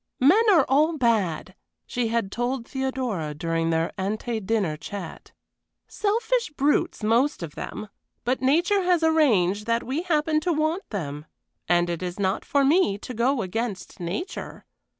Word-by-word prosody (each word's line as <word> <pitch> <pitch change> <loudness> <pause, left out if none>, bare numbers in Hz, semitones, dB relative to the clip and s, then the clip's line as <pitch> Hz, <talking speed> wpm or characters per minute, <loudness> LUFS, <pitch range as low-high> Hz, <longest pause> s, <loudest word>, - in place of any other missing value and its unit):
"Men 315 - +6
are 330 -9 +5
all 305 +4 +3
bad," 205 - 0 0.3
she 245 -2 -1
had 225 -4 -1
told 245 +1 -2
Theodora 255 - -3
during 165 +1 -1
their 165 0 0
ante 215 +4 -2
dinner 195 -6 0
chat. 195 +6 -8 0.6
"Selfish 460 +2 0
brutes 290 -5 0
most 235 - +2
of 155 -3 -6
them; 215 - -6 0.4
but 255 +2 0
nature 340 +9 +3
has 355 -2 +2
arranged 215 - +3
that 230 0 +1
we 270 +6 -2
happen 310 -3 +1
to 350 +3 -1
want 315 +5 -1
them, 150 -6 -5 0.4
and 175 0 +3
it 170 0 -3
is 180 +1 -5
not 190 0 0
for 280 -1 +2
me 295 - +3
to 250 - -8
go 240 +1 +1
against 205 +1 -4
nature. 180 - -5
235 Hz, 150 wpm, -25 LUFS, 190-300 Hz, 0.6 s, Men